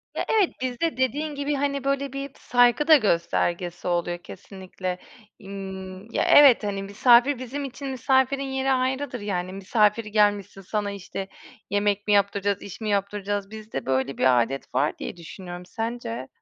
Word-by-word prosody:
Ya, -, -, -2 dB
evet. 420 Hz, -5 st, +3 dB
Bizde 255 Hz, +4 st, -2 dB
dediğin 285 Hz, +4 st, -1 dB
gibi, 285 Hz, +1 st, -1 dB
hani, 280 Hz, -1 st, -1 dB
böyle, 275 Hz, -1 st, -1 dB
bir 275 Hz, 0 st, -5 dB
saygı 245 Hz, +4 st, +3 dB
da 315 Hz, -, +9 dB
göstergesi 175 Hz, -4 st, -1 dB
oluyor 175 Hz, 0 st, 0 dB
kesinlikle. 185 Hz, 0 st, -7 dB, 0.4 s
Imm, 190 Hz, 0 st, -8 dB
ya, -, -, +1 dB
evet. 275 Hz, -6 st, +7 dB
Hani, 200 Hz, -1 st, -2 dB
misafir 240 Hz, +6 st, +4 dB
bizim 275 Hz, +3 st, -5 dB
için 275 Hz, +1 st, -7 dB
misafirin 265 Hz, +1 st, +1 dB
yeri 265 Hz, 0 st, -1 dB
ayrıdır. 260 Hz, 0 st, -1 dB
Yani, 185 Hz, -3 st, -3 dB
"Misafir 210 Hz, +3 st, +1 dB
gelmişsin. 205 Hz, -2 st, +1 dB
Sana, 205 Hz, +1 st, -2 dB
işte, 195 Hz, 0 st, -6 dB, 0.4 s
yemek 205 Hz, 0 st, 0 dB
mi 210 Hz, -, +3 dB
yaptıracağız? 200 Hz, 0 st, +1 dB
İş 200 Hz, +3 st, -9 dB
mi 215 Hz, -, -2 dB
yaptıracağız?" 200 Hz, 0 st, -2 dB
Bizde 215 Hz, -10 st, -6 dB
böyle 130 Hz, +1 st, -1 dB
bir 125 Hz, -2 st, +4 dB
adet 135 Hz, +2 st, -7 dB
var 140 Hz, +4 st, +1 dB
diye -, -, -6 dB
düşünüyorum. 175 Hz, +1 st, -9 dB
Sence? 225 Hz, -, -5 dB
205 Hz, 155 wpm, -25 LUFS, 190-260 Hz, 0.4 s, da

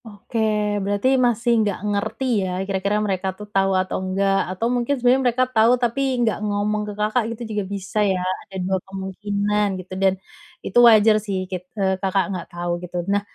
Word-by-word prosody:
Oke, 220 Hz, +1 st, -6 dB, 0.4 s
berarti 205 Hz, +5 st, +1 dB, 0.2 s
masih 240 Hz, 0 st, +1 dB
nggak 205 Hz, -3 st, -1 dB
ngerti 205 Hz, +5 st, -2 dB, 0.2 s
ya, 190 Hz, -, -2 dB, 0.2 s
kira-kira 195 Hz, +1 st, -1 dB
mereka 190 Hz, -1 st, -1 dB
tuh 210 Hz, -, -8 dB
tau 195 Hz, 0 st, +2 dB
atau 185 Hz, -, -3 dB
nggak, 195 Hz, +1 st, +1 dB
atau 185 Hz, +5 st, -3 dB
mungkin 245 Hz, +3 st, 0 dB
sebenernya 250 Hz, +2 st, +3 dB
mereka 255 Hz, +2 st, +1 dB
tau 225 Hz, +2 st, +5 dB
tapi 240 Hz, +2 st, -1 dB, 0.2 s
nggak 220 Hz, -, 0 dB
ngomong 210 Hz, 0 st, -1 dB
ke -, -, -5 dB
Kakak, 215 Hz, +3 st, +1 dB
gitu -, -, -14 dB
juga, 210 Hz, -1 st, -1 dB
bisa 200 Hz, +1 st, -3 dB
ya. 195 Hz, -3 st, +2 dB, 0.3 s
Ada 195 Hz, -, -12 dB
2 190 Hz, 0 st, +1 dB
kemungkinan 205 Hz, +2 st, -1 dB
gitu, 185 Hz, 0 st, -9 dB
dan 190 Hz, -1 st, +4 dB, 0.5 s
itu 195 Hz, -, -2 dB
wajar 215 Hz, -1 st, +6 dB
sih, 195 Hz, -3 st, -3 dB
git 185 Hz, -1 st, -6 dB
eee, 190 Hz, -1 st, 0 dB
Kakak 195 Hz, -1 st, +1 dB
nggak 180 Hz, -2 st, -5 dB
tau, 175 Hz, -1 st, -4 dB
gitu. 180 Hz, 0 st, -6 dB, 0.2 s
Nah, 205 Hz, -, +2 dB
205 Hz, 185 wpm, -22 LUFS, 190-215 Hz, 0.5 s, wajar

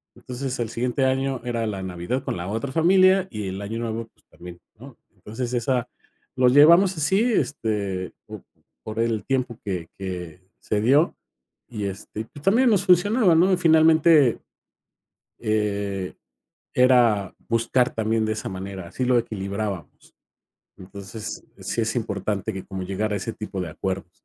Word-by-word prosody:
Entonces, 130 Hz, +1 st, -5 dB
el 115 Hz, -2 st, -2 dB
siguiente 125 Hz, +3 st, -1 dB
año, 130 Hz, 0 st, 0 dB
era 120 Hz, -2 st, -1 dB
la 100 Hz, -3 st, -4 dB
Navidad 95 Hz, +8 st, -3 dB
con 90 Hz, -, -3 dB
la 85 Hz, -, -5 dB
otra 115 Hz, +6 st, -3 dB
familia 185 Hz, +4 st, +4 dB
y 105 Hz, -3 st, -4 dB
el 95 Hz, +2 st, -5 dB
Año 110 Hz, +3 st, -4 dB
Nuevo, 115 Hz, 0 st, -4 dB
pues, -, -, -33 dB
también, 90 Hz, 0 st, -12 dB, 0.2 s
¿no? -, -, -13 dB, 0.2 s
Entonces 120 Hz, +3 st, -6 dB
esa 125 Hz, 0 st, 0 dB, 0.5 s
lo 130 Hz, -1 st, +4 dB
llevamos 170 Hz, +7 st, +6 dB
así 190 Hz, +7 st, +2 dB
este, 105 Hz, -, -2 dB
po -, -, -9 dB, 0.4 s
por 110 Hz, +1 st, -6 dB
el 115 Hz, -2 st, 0 dB
tiempo 125 Hz, -4 st, -1 dB
que 90 Hz, -5 st, -4 dB
que 90 Hz, -3 st, -6 dB, 0.2 s
se 105 Hz, -1 st, -1 dB
dio, 140 Hz, +8 st, +3 dB, 0.5 s
y 105 Hz, -4 st, -4 dB
este, 100 Hz, +2 st, -6 dB
y -, -, -4 dB
pues, 145 Hz, +5 st, -14 dB
también 235 Hz, +8 st, +4 dB
nos 200 Hz, -4 st, +2 dB
funcionaba, 190 Hz, +1 st, +4 dB
¿no? 180 Hz, +4 st, +4 dB
Y -, -, +3 dB
finalmente, 160 Hz, -4 st, +5 dB, 1.0 s
eh, 100 Hz, -3 st, -2 dB, 0.6 s
era 120 Hz, -6 st, +4 dB
buscar 115 Hz, +2 st, +2 dB
también 110 Hz, 0 st, 0 dB
de 110 Hz, -, 0 dB
esa 110 Hz, -, -4 dB
manera, 95 Hz, -1 st, -7 dB
así 130 Hz, -, -3 dB
lo 125 Hz, -1 st, +3 dB
equilibrábamos. 100 Hz, -5 st, -5 dB, 0.6 s
Entonces, 100 Hz, +3 st, -8 dB
eh, -, -, -14 dB
sí -, -, -1 dB
es 110 Hz, +1 st, -1 dB
importante, 105 Hz, -1 st, -2 dB
que 95 Hz, -1 st, -7 dB
como 95 Hz, -1 st, -6 dB
llegar 105 Hz, +3 st, -2 dB
a -, -, 0 dB
ese 105 Hz, +3 st, -4 dB
tipo 105 Hz, -3 st, -6 dB
de 90 Hz, -, -3 dB
acuerdos. 95 Hz, +2 st, -4 dB
115 Hz, 160 wpm, -24 LUFS, 100-135 Hz, 1.0 s, llevamos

